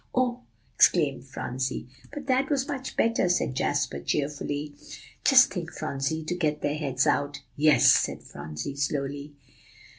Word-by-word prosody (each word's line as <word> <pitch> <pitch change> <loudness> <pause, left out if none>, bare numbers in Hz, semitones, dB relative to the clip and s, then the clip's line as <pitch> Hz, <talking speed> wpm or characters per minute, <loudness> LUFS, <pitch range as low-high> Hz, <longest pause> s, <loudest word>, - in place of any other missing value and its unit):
"Oh!" 250 -1 +1 0.3
exclaimed 145 -6 +3
Phronsie. 130 -1 -4 0.2
"But 285 -1 -7
that 265 +1 +1
was 275 -2 0
much 275 -3 -5
better," 230 -5 +2
said 175 -6 +1
Jasper 70 - -1
cheerfully. 145 - -3 0.5
"Just - - +6
think, - - -5
Phronsie, 140 +4 -3
to 155 - -3
get 155 -4 -1
their 145 - +1
heads 135 -3 0
out." 145 0 0
"Yes," 150 0 +4
said - - +4
Phronsie 80 - -7
slowly. 140 +1 -3
145 Hz, 140 wpm, -27 LUFS, 135-180 Hz, 0.5 s, Just